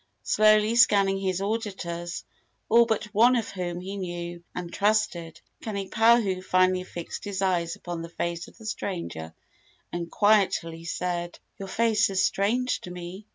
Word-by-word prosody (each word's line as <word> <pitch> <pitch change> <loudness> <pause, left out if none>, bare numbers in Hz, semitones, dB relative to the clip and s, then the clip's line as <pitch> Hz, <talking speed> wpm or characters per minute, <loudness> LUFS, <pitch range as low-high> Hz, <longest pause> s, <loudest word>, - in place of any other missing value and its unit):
Slowly 215 +1 +4
scanning 195 -4 +5
his 190 -1 -1
auditors, 190 -5 -3 0.5
all 235 +1 +6
but 220 -2 0
one 235 +4 +5
of 230 -3 -1
whom 175 -2 -4
he 195 +2 -6
knew 175 -2 -5
and 175 -1 -5
trusted, 200 -6 0 0.2
Kanipahu 215 -1 +2
finally 185 0 +2
fixed 175 -2 -7
his 200 -2 -4
eyes 170 -3 0
upon 175 -1 -6
the 165 - -7
face 170 0 -3
of - - -17
the 225 - -13
stranger 170 - -4 0.6
and 170 -1 -3
quietly 185 -6 +2
said: 175 0 -3 0.2
"Your 195 - -6
face 220 +1 +2
is 190 -1 +1
strange 245 +6 +1
to - - -8
me. 180 +3 -8
190 Hz, 150 wpm, -26 LUFS, 175-215 Hz, 0.6 s, all